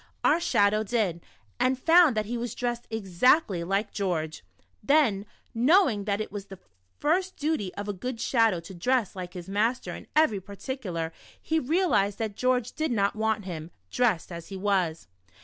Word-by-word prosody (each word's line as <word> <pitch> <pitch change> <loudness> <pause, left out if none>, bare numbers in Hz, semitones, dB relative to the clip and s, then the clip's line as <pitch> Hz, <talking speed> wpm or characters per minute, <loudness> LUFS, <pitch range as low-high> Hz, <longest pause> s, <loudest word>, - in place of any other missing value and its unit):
Our 315 - +4
Shadow 210 -9 +2
did. 210 -6 -1 0.4
and 260 +1 +2
found 325 -3 +5
that 215 - +1
he 235 +4 -4
was 240 0 -4
dressed 240 -1 -3
exactly 205 - +2
like 195 +4 -1
George. 160 -6 -2 0.4
Then, 220 -6 +2 0.3
knowing 250 - +3
that 200 -1 0
it 215 - -4
was 205 -2 -6
the 195 - -10 0.4
first 360 +5 0
dutv 295 -10 -1
of 205 0 -4
a 205 - -2
ofood 230 +5 -5
Shadow 225 -8 +2
to 175 +4 -11
dress 225 +4 0
like 180 -1 -7
his 175 0 -7
master 220 +6 0
in - - -10
even. 220 -11 +2
particular, 190 -5 -5 0.3
he 320 0 0
realized 255 - +1
that 220 -3 -3
George 250 -1 +1
g6 - - -35
The - - -15
Shadow. 315 - +1
did 240 - 0
not 200 -1 +1
want 220 -2 -1
him, 165 -3 -6 0.2
dressed 220 -9 +1
as 170 -1 -7
he 195 - -7
was. 185 -5 0
215 Hz, 185 wpm, -27 LUFS, 195-255 Hz, 0.4 s, found